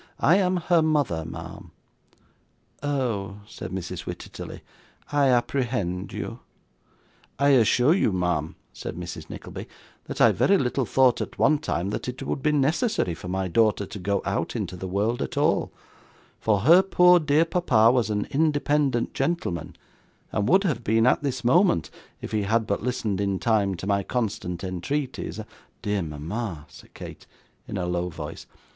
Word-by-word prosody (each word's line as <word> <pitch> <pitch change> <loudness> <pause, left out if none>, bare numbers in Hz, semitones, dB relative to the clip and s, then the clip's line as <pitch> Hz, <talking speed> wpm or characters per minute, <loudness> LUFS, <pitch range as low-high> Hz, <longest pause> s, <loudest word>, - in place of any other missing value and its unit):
I 170 +6 +5
am 185 -2 +2
her 175 -1 +3
mother, 145 - +1
ma'am.' - - -8 1.1
'Oh!' 115 -9 -2
said - - -8
Mrs. 95 -2 -5
Wititterly, - - -7 0.5
'I 145 -1 +3
apprehend 120 -7 0
you.' - - -5 1.0
'I 140 0 +3
assure 125 +2 +5
you, 180 - +2
ma'am,' 90 -4 -1 0.2
said - - -6
Mrs. 85 -2 -7
Nickleby, - - -8 0.4
'that - - -6
I - - +7
very 200 - +3
little 130 -2 0
thought, 130 +1 +3
at - - -6
one 155 -1 +3
time, 100 - -2
that - - -4
it 125 +2 -6
would - - -3
be 150 - +2
necessary 150 - +1
for 90 - -9
my 95 +1 -1
daughter 105 +2 +2
to 105 +1 -8
go 100 +1 -1
out - - -2
into - - -3
the 95 +1 -6
world 105 +6 0
at - - -4
all, - - +2 0.7
for 105 -3 +1
her 165 - +7
poor 180 -2 +5
dear 155 +1 +3
papa 125 -10 +4
was 120 -4 +1
an 105 -1 -1
independent 145 -4 +1
gentleman, 170 - -2 0.6
and 105 -1 0
would 190 +2 +5
have 140 - -1
been 115 +1 +3
at 125 - +3
this 130 -3 -3
moment 125 - +3 0.3
if - - -6
he 110 - 0
had 110 +3 +1
but 100 - -1
listened 110 -5 -1
in 100 -1 0
time 100 -3 +1
to 90 - -7
my 100 0 +1
constant 100 -5 -3
entreaties 95 - -3
and - - -7 0.2
' - - -39
'Dear 105 -1 0
mama,' 80 +3 -5
said - - -16
Kate, - - -10 0.4
in 105 - -4
a 90 - -1
low 90 0 -1
voice. 80 -3 -8
115 Hz, 165 wpm, -25 LUFS, 95-145 Hz, 1.1 s, I